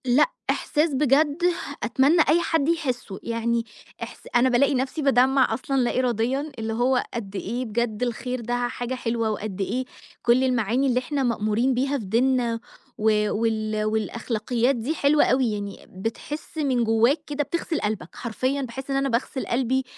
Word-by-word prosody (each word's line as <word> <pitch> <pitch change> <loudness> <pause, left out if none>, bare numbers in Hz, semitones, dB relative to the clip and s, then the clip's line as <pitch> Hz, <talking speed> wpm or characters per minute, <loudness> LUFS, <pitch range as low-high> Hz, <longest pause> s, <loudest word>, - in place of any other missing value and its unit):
لأ، 255 - +4 0.2
إحساس 300 0 +1
بجد 290 +2 +3 0.5
أتمنّى 275 +8 +4
أي 330 +3 +4
حد 325 -3 +1
يحسُّه 255 -11 -2
يعني 230 0 -1 0.4
إحس - - -10
أنا 245 +2 +5
بالاقي 265 +3 +3
نفسي 260 +4 -1
بادمَّع 265 -2 +4
أصلًا 270 +4 -2
لا 250 -1 +1
إراديًا، 255 +4 0
اللي 225 0 -2
هو 245 +2 +2
قد 205 -5 -5
إيه 240 +6 -3
بجد 225 0 -1
الخير 250 +1 -2
ده 245 +1 -1
حاجة 245 +1 -4
حلوة، 230 -2 -1
وقد 205 -2 -4
إيه 255 +6 -1 0.4
كل 240 +2 +4
المعاني 250 +1 +1
اللي 250 -1 +2
إحنا 275 +2 -2
مأمورين 235 +1 +1
بيها 270 +3 0
في 215 - -7
ديننا 235 +2 +1 0.4
و 210 -1 +2
وال 215 -1 0
والأخلاقيات 230 +3 0
دي 245 +6 -2
حلوة 295 0 +4
أوي، 255 -3 +2
يعني 200 -1 -6
بتحس 230 - -6
من 265 -6 +1
جواك 230 +6 +3
كده 295 -1 -1
بتغسل 335 +1 -2
قلبك 210 -5 -3
حرفيًا، 255 +4 -2
باحس 265 +1 -6
إن - - 0
أنا 275 0 +1
باغسل 255 +2 -1
قلبي 260 +2 +1
245 Hz, 160 wpm, -24 LUFS, 225-270 Hz, 0.5 s, أنا